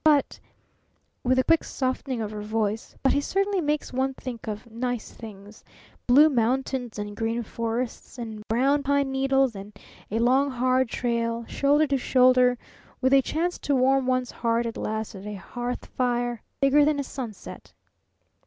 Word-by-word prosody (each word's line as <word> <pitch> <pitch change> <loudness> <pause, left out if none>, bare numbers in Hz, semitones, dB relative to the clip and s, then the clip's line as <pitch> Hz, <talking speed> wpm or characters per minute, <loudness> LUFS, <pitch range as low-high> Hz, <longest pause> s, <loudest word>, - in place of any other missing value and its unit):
But 300 -3 +3 0.4
" - - -44
with 255 +1 +2
a 260 - +4
quick 330 +3 +3
softening 260 -2 -2
of 215 -1 -3
her 210 -1 -6
voice 215 0 -2
"but 270 - +4
he 285 - +2
certainly 390 +4 0
makes 295 -3 -1
one 265 +1 0
think 245 -4 -7
of 215 +2 -5
nice 245 0 -3
things 210 -1 -12 0.4
Blue 280 +5 +7
Mountains, 255 -2 0
and 205 0 -5
Green 225 +2 -1
Forests, 230 +3 -4
and 220 -3 -6
Brown 270 +6 +2
Pine 280 -1 +1
Needles, 270 -2 +2
and 200 +1 -10 0.3
a 215 - -1
Long, 260 +4 +3
Hard 255 0 +1
Trail, 230 0 -1
shoulder 290 +5 +2
to 275 -2 0
shoulder 250 -1 +4 0.4
with 260 0 +2
a 275 - +7
chance 340 +6 -2
to 285 - 0
warm 265 0 +3
one's 255 -1 0
heart 230 0 0
at 230 - -4
last 220 +1 -3
at 195 +1 -9
a 210 - -5
hearth 245 +5 -5
fire 240 -2 -1 0.2
bigger 275 +1 +5
than 295 0 +2
a - - 0
sunset!" 245 -6 -8
250 Hz, 170 wpm, -26 LUFS, 230-270 Hz, 0.4 s, Blue